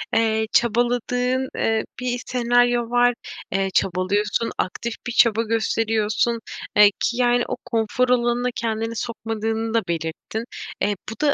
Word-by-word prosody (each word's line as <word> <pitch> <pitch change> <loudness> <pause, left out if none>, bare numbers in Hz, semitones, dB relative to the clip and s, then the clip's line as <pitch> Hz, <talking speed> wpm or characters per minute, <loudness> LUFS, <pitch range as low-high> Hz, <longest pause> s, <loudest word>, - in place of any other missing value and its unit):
eee, 220 -1 +2
çabaladığın, 245 +2 +1
eee, 225 0 +1 0.2
bir 245 -1 -2
senaryo 245 -1 +2
var, 245 0 +4 0.4
eee, 195 0 0
çabalıyorsun, 200 +5 0
aktif 230 +5 -2
bir 240 - -2
çaba 230 -1 +4
gösteriyorsun. 225 0 0 0.4
Eee, 210 -1 +8
ki, 240 - 0
yani, 245 -1 +3
o - - -2
konfor 230 +2 0
alanına 245 0 +2
kendini 225 0 -2
sokmadığını 225 0 -3
da 230 - +3
belirttin. 165 +7 -4 0.4
Eee, 205 +1 +1
bu 220 - -8
da 285 - +4
230 Hz, 130 wpm, -22 LUFS, 220-245 Hz, 0.4 s, Eee